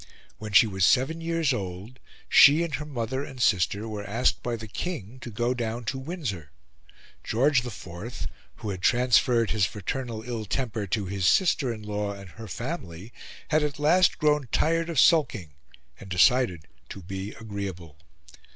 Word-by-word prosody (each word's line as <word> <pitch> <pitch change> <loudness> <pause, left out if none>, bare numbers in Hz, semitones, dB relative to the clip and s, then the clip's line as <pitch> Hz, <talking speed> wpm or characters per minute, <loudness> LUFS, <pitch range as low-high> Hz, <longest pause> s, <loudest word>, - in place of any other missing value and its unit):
When 110 -1 -6
she 100 - +7
was 95 -3 -2
seven 135 - +3
years 165 -3 0
old, 100 +3 -6 0.3
she 150 +4 +7
and 170 -3 -4
her 150 +2 -3
mother 130 0 -3
and 135 -3 -9
sister 100 -1 +1
were 105 -2 -5
asked 115 +5 0
by 120 -1 -2
the 110 -1 -8
King 130 - -5
to 125 - -8
go 120 +3 -1
down 120 -1 -3
to 130 +5 -3
Windsor. 130 - -5 0.7
George 130 +2 +2
IV, 100 -1 -7 0.3
who 105 - -5
had 95 -2 -6
transferred 120 0 +3
his 100 -3 +2
fraternal 110 +3 -5
ill 115 -2 -4
temper 110 -2 -3
to 105 +1 -1
his 95 0 -1
sister 150 - +3
in 110 -2 -7
law 105 -1 -3
and 100 -2 -11
her 110 +4 -10
family, 110 - -6 0.4
had 155 0 +3
at 150 0 -2
last 170 +6 +4
grown 150 -3 +2
tired 165 +1 +1
of 165 -5 0
sulking, 125 - +3 0.5
and 95 - -11
decided 90 -2 +3 0.2
to 100 - -9
be 95 +3 -6
agreeable. 95 -8 -7
115 Hz, 165 wpm, -26 LUFS, 100-135 Hz, 0.7 s, she